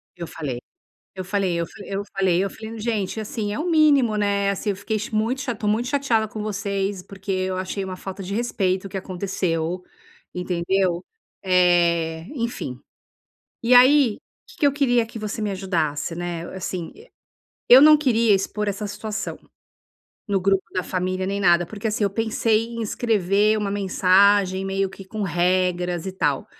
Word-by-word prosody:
Eu 170 -2 -6
falei 140 -8 -5 0.6
eu 185 -1 -5
falei 190 -3 0
eu 170 - 0 0.2
eu 200 0 -3
falei 185 -1 +2
eu 195 - -2
falei, 225 +2 -9
"Gente 220 -2 -2
assim 215 -1 -3
é 210 - -3
o 345 +3 -1
mínimo, 290 -8 +4
né, 200 -1 +1
assim 200 +2 -3
eu 200 - 0
fiquei 210 +3 -3
cha 215 +2 -5
muito 230 +5 0
tô 210 -1 -3
muito 225 +4 +1
chateada 255 -6 +1
com 215 0 -6
vocês 200 -2 -2
porque 195 +1 -7
eu 185 0 -1
achei 190 +1 -3
uma 185 -1 -6
falta 190 +1 -7
de 195 - -5
respeito 195 -5 -1
o - - -6
que 195 - -5
aconteceu, 180 -2 -2 0.5
entendeu?" 180 0 0 0.4
Eh, 170 -3 +2
enfim. 235 - -4 0.9
E 245 +2 +4
aí, 255 -2 +6
o - - -21 0.3
que - - -18
que 295 - +5
eu 280 - +3
queria 245 -5 +2
que 225 0 -9
você 215 +1 -4
me 210 - -1
ajudasse, 170 -5 -2
né, 175 -1 -4
assim, 180 -2 -5 0.8
eu 255 +2 +10
não 305 +1 +8
queria 235 -7 +3
expor 205 +2 -1
essa 205 +1 -3
situação 210 +1 -5 0.9
no 200 -2 +1
grupo 195 0 +2
da 185 - -1
família 185 0 -2
nem 200 +1 -2
nada 175 -2 +4
porque, 210 +4 -4
assim, 215 -1 0
eu 200 - +1
pensei 225 +1 +1
em 230 -1 -5
escrever 210 -1 +1
uma 205 -1 -2
mensagem 195 0 +3
meio 195 0 -1
que 195 0 -11
com 210 +3 -5
regras, 180 -1 0
e 190 - -3
tal. 145 -7 -1
195 Hz, 175 wpm, -23 LUFS, 185-220 Hz, 0.9 s, eu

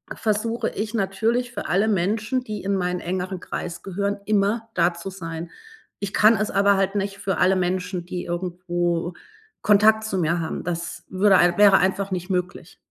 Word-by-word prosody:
versuche 225 +2 -1
ich 215 +2 -4
natürlich, 225 +4 0
für - - -5
alle 200 +4 +2
Menschen, 210 +6 0
die 210 -3 -5
in 200 +1 0
meinen 180 -1 -1
engeren 185 +1 -3
Kreis 175 -1 -6
gehören, 200 +1 -2
immer 215 +2 +1
da 170 0 +3
zu 170 +3 -7
sein. 165 -3 -7 0.5
Ich 200 -1 -4
kann 215 +1 +5
es 215 +1 -1
aber 200 0 +3
halt 195 +1 0
nicht 200 0 -2
für 195 -1 -2
alle 190 +1 +4
Menschen, 180 -1 -2
die 180 0 -5
irgendwo 175 -1 -2 0.5
Kontakt 215 +1 +4
zu 205 -3 -2
mir 170 +1 +1
haben, 160 -1 -4
das 170 -1 -4
würde 190 0 +4
ein 175 0 +3
wäre 205 -2 +7
einfach 195 +1 0
nicht 180 0 -3
möglich. 180 -2 -3
190 Hz, 175 wpm, -23 LUFS, 180-210 Hz, 0.5 s, wäre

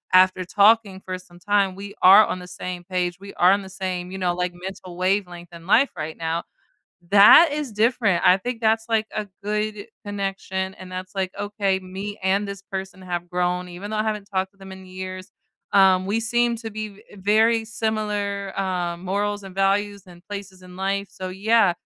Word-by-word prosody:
after 185 0 +5
talking 200 0 +3
for 185 0 -4
some 175 -1 -16
time, 200 0 +1
we 200 +1 -9
are 195 +4 +9
on 185 - -2
the 180 - -9
same 180 -1 -6
page, 180 -1 -2
we 200 0 -10
are 180 +1 +5
on 200 +1 +2
the 190 - -10
same, 185 -1 -4
you 190 - -5
know, 180 -2 0
like, 180 0 -2
mental 185 0 -8
wavelength 180 -2 -1
in 170 -1 -12
life 235 +9 +4
right 155 +1 -5
now. 165 +1 -2 0.7
That 210 +11 +9
is 295 -5 -3
different. 220 -4 +2
I 180 - +7
think 240 +3 -4
that's, 225 0 +1
like, 220 -1 +2
a 215 -1 -2
good 210 0 -2 0.2
connection, 195 -1 -3
and 185 -1 -12
that's 185 +1 -7
like, 190 -1 -1
"Okay, 205 -2 0
me 195 +3 -7
and 195 +2 +1
this 200 -1 -7
person 190 -1 -7
have 175 -1 -4
grown, 180 0 -1
even 180 +4 -8
though 215 - -2
I 215 - +1
haven't 210 -2 -2
talked 190 -1 -1
to 200 - -32
them 195 0 -11
in 190 0 -12
years, 185 +1 -7 0.4
um, 190 -2 +5
we 205 +4 0
seem 240 +1 +1
to 225 0 -6
be 215 0 -5
v 200 0 -17
very 220 +3 +3
similar, 210 -3 -2
uh, 180 -3 -1
morals 205 +3 -2
and 190 - -10
values 200 +1 +1
and 175 -1 -14
places 200 -2 -7
in 180 0 -13
life, 195 +1 -1
so, 185 -2 -6
yeah, 205 +1 +3
195 Hz, 200 wpm, -23 LUFS, 185-205 Hz, 0.7 s, are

